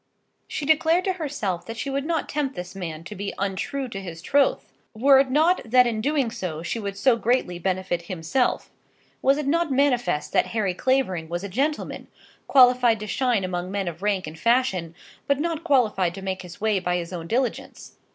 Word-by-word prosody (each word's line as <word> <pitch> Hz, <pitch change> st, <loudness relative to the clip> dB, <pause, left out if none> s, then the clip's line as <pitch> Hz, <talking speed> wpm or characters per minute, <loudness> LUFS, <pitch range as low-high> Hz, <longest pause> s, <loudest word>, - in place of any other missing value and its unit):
She 295 Hz, -, -4 dB
declared 320 Hz, +4 st, +3 dB
to 375 Hz, -, 0 dB
herself 220 Hz, -, -3 dB
that 225 Hz, -, -6 dB
she -, -, -4 dB
would 275 Hz, +1 st, -2 dB
not 330 Hz, -2 st, -1 dB
tempt 280 Hz, -2 st, -2 dB
this 180 Hz, 0 st, -7 dB
man 165 Hz, -4 st, -6 dB
to 195 Hz, -, -8 dB
be 200 Hz, 0 st, -5 dB
untrue 200 Hz, +8 st, -2 dB
to 195 Hz, -4 st, -6 dB
his 170 Hz, -3 st, -8 dB
troth, 280 Hz, +6 st, +2 dB, 0.3 s
were 270 Hz, +4 st, +6 dB
it 270 Hz, -1 st, +2 dB
not 315 Hz, +7 st, +3 dB
that 250 Hz, +2 st, +4 dB
in 225 Hz, -2 st, -1 dB
doing 275 Hz, -2 st, 0 dB
so 175 Hz, -8 st, -5 dB
she 230 Hz, -, -3 dB
would 200 Hz, -2 st, -5 dB
so 255 Hz, +3 st, +4 dB
greatly 230 Hz, -6 st, 0 dB
benefit 180 Hz, -2 st, -2 dB
himself. 185 Hz, +9 st, -1 dB, 0.5 s
Was 275 Hz, +1 st, +4 dB
it 300 Hz, -, -2 dB
not 330 Hz, +2 st, +1 dB
manifest 255 Hz, -, +1 dB
that -, -, +3 dB
Harry 200 Hz, -4 st, +1 dB
Clavering 190 Hz, -8 st, 0 dB
was 175 Hz, +2 st, -3 dB
a 200 Hz, -, -5 dB
gentleman, 280 Hz, +10 st, -2 dB, 0.4 s
qualified 250 Hz, -3 st, +5 dB
to 210 Hz, -, -5 dB
shine 240 Hz, -1 st, 0 dB
among 180 Hz, 0 st, -3 dB
men 195 Hz, -1 st, -2 dB
of 170 Hz, 0 st, -5 dB
rank 200 Hz, -2 st, 0 dB
and 155 Hz, +1 st, -9 dB
fashion, 215 Hz, -9 st, +1 dB, 0.3 s
but 280 Hz, -1 st, +2 dB
not 330 Hz, 0 st, -2 dB
qualified 215 Hz, -, +2 dB
to 195 Hz, -, -8 dB
make 190 Hz, -1 st, -3 dB
his 180 Hz, -2 st, -11 dB
way 215 Hz, -2 st, +1 dB
by 180 Hz, -1 st, -1 dB
his 170 Hz, +1 st, -5 dB
own 165 Hz, -2 st, -5 dB
diligence? 250 Hz, +5 st, -3 dB
220 Hz, 200 wpm, -24 LUFS, 185-270 Hz, 0.5 s, were